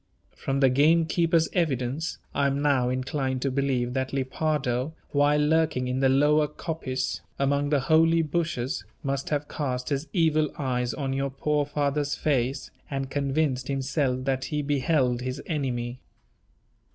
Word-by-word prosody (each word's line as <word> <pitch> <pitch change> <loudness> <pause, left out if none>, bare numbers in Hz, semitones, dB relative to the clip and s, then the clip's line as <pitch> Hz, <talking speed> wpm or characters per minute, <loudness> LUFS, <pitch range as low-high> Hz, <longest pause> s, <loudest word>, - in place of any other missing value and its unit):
From 135 +1 -2
the 135 - +6
gamekeeper's 165 +3 +3
evidence, 145 -2 -1 0.2
I 140 - +2
am 140 0 0
now 140 -4 +2
inclined 130 0 -2
to 135 - 0
believe 130 -2 0
that 130 0 -1
Lepardo, 135 0 -1 0.2
while 145 +1 +3
lurking 150 -4 +2
in 125 +1 -1
the 135 0 +4
lower 150 +3 +4
coppice, 150 -4 -3 0.2
among 140 +1 +1
the 145 -2 +2
holly 165 +4 +4
bushes, 150 -8 -2 0.2
must 135 0 -2
have 145 -1 -1
cast 125 -4 -3
his 145 +2 -2
evil 155 -4 +2
eyes 125 -4 -1
on 135 -2 -2
your 135 +1 -1
poor 145 +2 0
father's 145 0 0
face, 135 -3 -1 0.2
and 135 -1 -3
convinced 140 -2 0
himself 135 -1 -1
that 130 -1 0
he 150 -1 -2
beheld 135 -3 +1
his 130 +2 -4
enemy. 125 -5 -2
140 Hz, 145 wpm, -26 LUFS, 130-150 Hz, 0.2 s, the